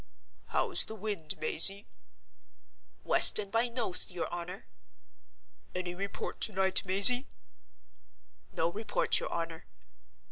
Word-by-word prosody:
"How's - - -2
the 220 - -9
wind, 205 -7 -6
Mazey?" 205 - +1 1.2
"West - - +6
and 200 -2 -4
by 230 +2 -1
Noathe, 230 -7 -3
your 175 -2 -6
honor." 175 +2 -9 1.1
"Any 180 -1 -5
report 200 +2 -8
to 215 - -1
night, 190 0 -1
Mazey!" 225 +8 +8 1.2
"No 165 +1 -3
report, 215 +4 -3
your - - -8
honor." 165 -1 -7
195 Hz, 110 wpm, -28 LUFS, 175-220 Hz, 1.2 s, Mazey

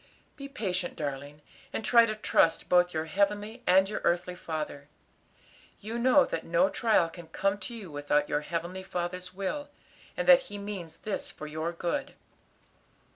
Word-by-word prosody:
Be 275 -1 -8
patient, 185 -9 -2
darling, 145 0 -5 0.3
and 220 - -3
try 235 -1 +6
to 215 - -2
trust 165 -5 +2
both 180 0 +4
your 160 -1 -2
heavenly 205 +6 0
and 190 +1 +6
your 210 - -4
earthly 175 +1 +1
father. 155 -5 -5 0.9
You 225 +3 -5
know 260 +3 +5
that - - -3
no 170 +3 +3
trial 215 -6 +3
can 165 0 -11
come 195 +5 0
to 235 +5 -6
you 200 -8 -8
without 145 0 +1
your 145 - 0
heavenly 170 +4 -4
Father's 180 0 -4
will, 285 +10 -3 0.5
and - - -2
that - - +9
He 205 - -6
means 200 -5 -6
this 215 - -3
for 155 - -9
your 155 +2 -3
good. 170 0 -3
180 Hz, 165 wpm, -29 LUFS, 165-210 Hz, 0.9 s, that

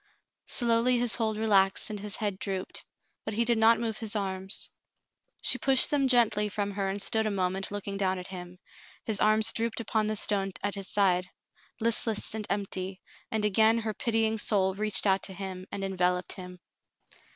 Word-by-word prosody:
Slowly 240 +1 +2
his 240 -1 +2
hold 220 -3 0
relaxed 200 -2 +3
and 210 - -5
his 205 -1 -1
head 205 -3 -2
drooped, 190 -2 -4 0.4
but 215 - -4
he 235 +2 +1
did 235 -1 +1
not 225 +1 +5
move 225 -2 -3
his 220 -1 -2
arms. 190 -1 -2 0.7
She 255 - +3
pushed 265 +2 +4
them 280 -2 +2
gently 220 -4 +3
from 205 0 -3
her 195 -1 -2
and 195 +1 -3
stood 220 +2 +1
a - - +1
moment 190 -1 -1
looking 200 -1 -5
down 190 -1 0
at 180 +1 -8
him. 180 -1 -9 0.5
His 215 -3 -1
arms 215 +1 +4
dropped 230 0 -1
upon 220 -1 -1
the 215 - -1
stone 195 -2 +1
at 205 -1 -1
his 195 -2 -6
side, 180 -3 +1 0.5
listless 225 -1 +1
and 220 -1 -4
empty, 190 -2 -3 0.3
and 220 -1 -1
again 220 +2 +4
her 220 -1 -3
pitying 225 0 0
soul 190 -3 +3
reached 210 0 0
out 195 -1 +3
to 190 - -4
him 190 -1 -7
and 195 - -4
envel 180 -2 +1
oped 180 - -6
him. 180 -1 -9
205 Hz, 185 wpm, -28 LUFS, 190-220 Hz, 0.7 s, not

